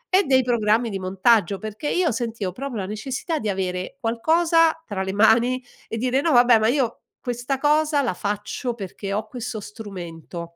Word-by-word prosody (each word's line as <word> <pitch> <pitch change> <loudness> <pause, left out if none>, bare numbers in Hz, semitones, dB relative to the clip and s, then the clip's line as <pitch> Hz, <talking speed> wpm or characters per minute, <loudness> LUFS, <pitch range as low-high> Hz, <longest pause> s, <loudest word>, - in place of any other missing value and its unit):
e 395 - +5
dei 260 -1 +4
programmi 230 -1 +1
di 195 - -3
montaggio, 195 +1 +2
perché 215 +7 -5
io 360 -2 +2
sentivo 225 -4 -3
proprio 265 +3 -5
la 195 - -2
necessità 265 - -3
di 215 - -2
avere 185 +4 -3
qualcosa 325 +8 +3
tra 200 -3 -4
le 190 - -2
mani 230 +5 +4 0.3
e 225 - -4
dire: 255 +3 +1
"No 325 0 +1
vabbè, 240 -2 +6
ma 215 - +2
io 250 -2 0 0.2
questa 245 +2 -3
cosa 300 +1 +2
la 240 - 0
faccio 205 +5 -3
perché 195 -1 -6
ho 215 +2 -2
questo 235 -1 -5
strumento." 180 -6 -8
230 Hz, 175 wpm, -23 LUFS, 205-260 Hz, 0.3 s, vabbè